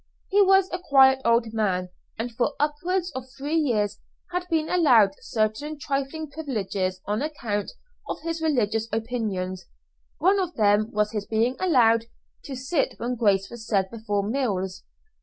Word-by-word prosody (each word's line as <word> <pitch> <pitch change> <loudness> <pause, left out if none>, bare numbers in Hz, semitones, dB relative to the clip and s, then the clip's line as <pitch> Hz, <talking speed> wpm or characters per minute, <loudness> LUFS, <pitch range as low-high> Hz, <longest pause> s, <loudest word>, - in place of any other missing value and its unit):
He 405 +1 +4
was 385 -1 +5
a 360 - -2
quiet 265 -5 +5
old 230 -1 +2
man, 185 -5 0 0.3
and 235 +2 -3
for 245 +5 -1
upwards 345 +5 0
of 260 0 -7
three 290 +3 -4
years 230 -10 +1 0.3
had 360 0 -2
been 320 -2 +1
allowed 250 - +5
certain 225 +8 -2
trifling 280 +2 -3
privileges 200 -11 -3
on 210 +3 -1
account 230 -9 -3 0.4
of - - -3
his 330 0 -3
religious 225 -8 +1
opinions, 205 -6 -3 0.5
one 390 +3 +3
of 360 -2 -2
them 210 0 +3
was 210 0 0
his 210 -2 -4
being 230 +3 +1
allowed 230 -10 +4 0.4
to 275 - -5
sit 265 +4 -1
when 240 +2 -2
grace 200 -5 +1
was 230 -2 -9
said 195 -4 +1
before 210 -3 -2
meals. 195 -7 -2
240 Hz, 155 wpm, -25 LUFS, 210-300 Hz, 0.5 s, was